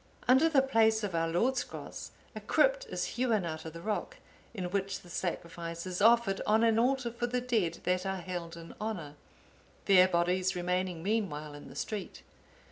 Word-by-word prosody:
Under 265 +6 +6
the 275 -4 +4
place 220 -4 +3
of 200 -3 -2
our 165 0 +1
Lord's 235 +11 +1
Cross, - - -8 0.3
a - - -6
crypt - - +2
is - - -2
hewn 225 -7 +2
out 160 -1 -5
of 160 - -7
the 165 - -8
rock, 215 -1 -3 0.3
in 200 -6 -5
which 195 0 -2
the 175 - -14
Sacrifice 170 -1 -4
is 185 +1 -4
offered 225 -3 +4
on 220 +2 +4
an 225 -1 +4
altar 255 0 +1
for 240 +1 -2
the 250 +1 0
dead 220 -10 0
that 180 0 +1
are 190 -1 -2
held 175 -2 -6
in 165 0 -10
honour, 185 -10 -4 0.7
their 185 -2 +7
bodies 180 +1 +1
remaining 180 -1 -1
meanwhile 175 -8 -2
in 145 - -11
the - - -12
street. 210 -3 -5
190 Hz, 185 wpm, -31 LUFS, 170-230 Hz, 0.7 s, their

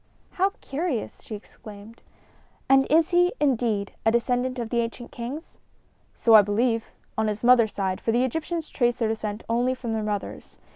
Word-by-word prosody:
"How 385 +2 +1
curious!" 280 -4 -3
she 215 - -7
exclaimed. 210 +1 -13 0.7
"And 270 0 +5
is 325 +3 +4
he, 355 +1 +4
indeed, 230 -7 0
a 225 - +4
descendant 245 +2 0
of 235 -2 -4
the 240 - +1
ancient 235 +1 -4
kings?" 255 +7 -7 0.6
"So 230 - +3
I 215 - +10
believe 225 +3 0 0.3
on 220 - +1
his 210 +1 -3
mother's 235 -4 +5
side, 190 -2 -2
for 225 - 0
the 240 +2 +2
Egyptians 320 +4 -3
trace 240 -2 +1
their 230 -3 -1
descent 215 -1 -4
only 245 +3 +1
from 240 -3 -4
their 220 - -1
mothers. 210 -1 -5
235 Hz, 175 wpm, -25 LUFS, 220-260 Hz, 0.7 s, I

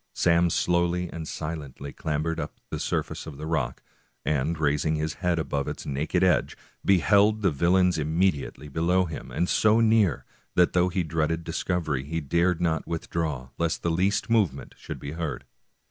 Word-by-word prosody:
Sam 85 0 +3
slowly 85 +1 +1
and 80 -2 -6
silently 75 -3 -6
clambered 80 +1 -2
up - - -6
the - - -3
surface - - -2
of 75 -3 -8
the 75 - -6
rock, 80 -1 -2 0.4
and 75 +2 0
raising 75 +1 +1
his 75 0 -2
head 90 -2 +1
above 70 -3 -2
its - - -5
naked 75 +6 0
edge, 90 -2 +2 0.3
beheld 100 +3 +4
the 95 - +4
vil 85 +5 +2
lains 90 -3 +3
immediately 80 -1 0
below 85 +5 +1
him, 80 -3 -7
and 90 - 0
so 110 +4 +4
near 110 - +3 0.3
that 90 -1 +4
though 90 0 +3
he 90 0 0
dreaded 80 +1 -1
discovery 80 -4 -1
he 80 +4 -3
dared 85 +4 +1
not 85 -2 0
withdraw 80 -5 -3
lest 85 -1 -1
the 85 - +1
least 95 +5 +1
move 110 - +3
ment 65 0 -10
should - - -7
be 70 - -6
heard. 80 -1 -4
85 Hz, 175 wpm, -26 LUFS, 75-90 Hz, 0.4 s, beheld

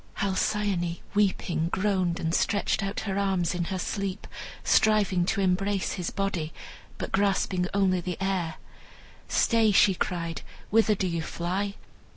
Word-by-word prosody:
Halcyone, 195 -3 0 0.2
weeping, 190 -5 +1
groaned, 185 -3 0
and 165 0 -1
stretched 205 +3 +1
out 195 +1 -2
her 195 -2 -2
arms 190 -4 +1
in 175 -1 -1
her 190 - -3
sleep, 195 +1 -3 0.4
striving 200 -5 +3
to 200 - 0
embrace 195 +1 +1
his 180 -3 -3
body, 180 -6 -2 0.5
but - - -5
grasping 190 -2 +1
only 190 -2 +2
the 180 0 -4
air. 185 -4 -1 0.7
"Stay!" 225 -2 +3
she 195 0 +5
cried; 170 -2 -3 0.3
"whither 220 0 +4
do 190 - -1
you 170 -2 -1
fly? 190 +5 -2
190 Hz, 140 wpm, -27 LUFS, 175-200 Hz, 0.7 s, she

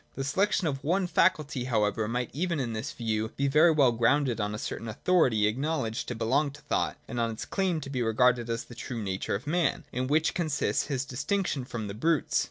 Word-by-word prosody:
The 135 - -3
selection 190 +7 +1
of 135 -4 -2
one 180 +5 +1
faculty 155 -7 +1
however 110 -3 +1
might 120 +1 -2
even 170 +1 -1
in 120 -4 -2
this 110 0 -4
view 110 -2 -2
be 140 - +1
very 150 +5 +5
well 145 -6 +4
grounded 120 +1 +2
on 105 +1 -2
a - - -4
certain 115 - -5
authority 115 -3 +2
acknowledged 120 0 -1
to 125 - -3
belong 130 +7 +1
to 145 - -13
thought, - - -1
and 120 - -4
on 115 0 +1
its 110 - -5
claim 185 -4 0
to 135 - -7
be 130 -3 -1
regarded 120 +1 +2
as 115 0 -2
the - - -13
true 120 0 -6
nature 95 0 -2
of 105 - -5
man, 170 +3 0
in 125 +1 -2
which 155 +3 +2
consists 155 -5 0
his 135 -3 -2
distinction 140 +1 -1
from 115 -4 -5
the 100 - -5
brutes. 160 +7 +1
130 Hz, 215 wpm, -28 LUFS, 115-155 Hz, -, very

